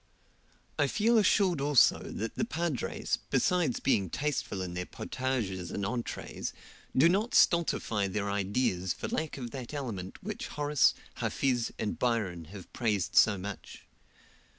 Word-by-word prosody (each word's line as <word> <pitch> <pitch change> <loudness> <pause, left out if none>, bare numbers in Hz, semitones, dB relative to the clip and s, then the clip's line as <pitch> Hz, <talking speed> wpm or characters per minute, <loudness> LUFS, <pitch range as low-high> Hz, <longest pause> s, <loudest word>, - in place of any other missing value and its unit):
I - - +4
feel 225 +1 +3
assured 190 -6 +3
also 145 -2 +5
that 115 - -5
the - - -1
padres, 170 - -2
besides 175 -8 +2
being 100 -8 +1
tasteful 135 - -2
in 90 -1 -5
their 90 0 -4
potages 110 -9 -3
and 100 - -3
entrees, 120 +3 -4 0.4
do 140 +6 +7
not 205 +7 +1
stultify 115 - +3
their 100 +1 -2
ideas 100 -2 0
for - - -5
lack 160 -2 -2
of 120 -3 -6
that 130 +1 -6
element 105 -10 -5
which 215 +5 -4
Horace, 145 -3 +2 0.2
Hafiz, 125 -4 0
and 105 - -3
Byron 100 -9 0
have 95 +3 -11
praised 105 -7 -1
so 105 -3 +6
much. 100 +2 -8
120 Hz, 140 wpm, -30 LUFS, 100-150 Hz, 0.4 s, do